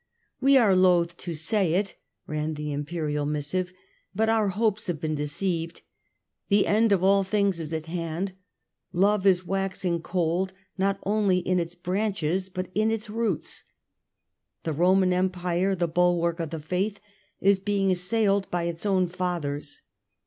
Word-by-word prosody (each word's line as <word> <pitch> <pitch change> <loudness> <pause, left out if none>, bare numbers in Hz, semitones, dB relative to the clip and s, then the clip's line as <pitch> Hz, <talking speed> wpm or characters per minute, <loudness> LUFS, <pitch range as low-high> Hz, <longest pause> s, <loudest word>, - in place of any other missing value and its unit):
" - - -46
We 275 +1 +6
are 215 -7 +5
loth 175 -2 +3
to 170 -2 -5
say 175 +1 +1
it," 195 +1 -1 0.3
ran 155 +1 -3
the 150 0 -4
Imperial 150 0 -2
missive, 150 +5 -1 0.2
" - - -40
but 220 +1 +2
our 220 -2 +3
hopes 210 +1 0
have 175 -4 -2
been 155 -1 -2
deceived; 165 +3 -2 0.7
the 200 0 +4
end 220 +1 +3
of 190 -2 +3
all 195 +1 +4
things 200 -2 +1
is 160 -1 -4
at 160 -1 -3
hand; 170 +2 -3 0.6
love 200 +2 +2
is 185 -1 +3
waxing 190 -2 -1
cold, 180 +2 -1 0.2
not 195 +1 +1
only 200 -2 +2
in 180 0 +1
its 170 0 -4
branches 185 -1 -1
but 185 -1 -5
in 215 +2 +2
its 220 -1 -3
roots. 220 -6 -2 1.0
The 160 - -2
Roman 185 +3 +3
Empire, 180 +1 0
the 175 -1 0
bulwark 170 0 +1
of 165 -2 -3
the 160 0 -5
Faith, 185 +7 -2 0.4
is 195 0 +4
being 195 -1 +1
assailed 195 +2 +1
by 175 -1 -1
its 170 +3 -3
own 190 -2 +3
fathers. 170 -5 -4
180 Hz, 160 wpm, -26 LUFS, 170-195 Hz, 1.0 s, We